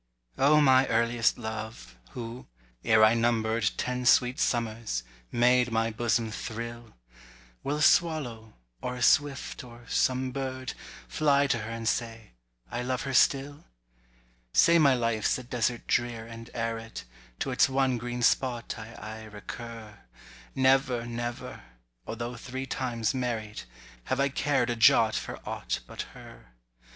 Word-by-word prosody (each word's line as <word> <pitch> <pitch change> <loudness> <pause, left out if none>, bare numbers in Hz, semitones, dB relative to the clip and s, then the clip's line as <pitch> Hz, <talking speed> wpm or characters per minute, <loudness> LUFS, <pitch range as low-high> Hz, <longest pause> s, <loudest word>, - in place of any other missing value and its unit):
O 150 +3 +5
MY 130 -2 +5
earliest 115 0 +2
love, 110 - -7 0.2
who, 120 +1 -7 0.4
ere 110 -1 +5
I 110 - +5
number'd 115 -3 +1
Ten 125 0 -2
sweet 125 +1 +4
summers, 115 - -1 0.3
made 125 0 +3
my 115 0 +1
bosom 115 0 0
thrill! 115 - -7 0.7
Will 145 +2 -1
a - - -3
swallow—or 115 - 0
a 125 - -3
swift, 145 -2 +2
or 120 -1 -13
some 130 0 +1
bird— 130 -1 -4 0.3
Fly 145 -2 +3
to 125 -4 +1
her 110 +1 -6
and 115 0 -4
say, 115 -1 -2 0.4
I 120 - -2
love 125 +1 -2
her 135 - -4
still? 140 +2 +2 0.9
Say 170 0 +6
my 140 -4 +5
life's 115 -3 0
a 125 - -8
desert 120 -1 -1
drear 120 -2 -1
and 115 0 -10
arid, 115 - -4 0.4
To - - -1
its - - +4
one 130 -2 +1
green 120 +1 -4
spot 120 -1 +1
I 110 +2 -9
aye 110 0 -8
recur: 110 0 -9 0.6
Never, 130 -2 +3
never—although 115 - -7
three 130 +3 -6
times 120 -3 -2
married— 115 - -3 0.4
Have 130 - -1
I 140 0 +3
cared 135 -3 +1
a - - -1
jot 110 -1 +5
for - - -4
aught - - -3
but - - -6 0.2
her. - - -14
120 Hz, 140 wpm, -28 LUFS, 115-130 Hz, 0.9 s, Say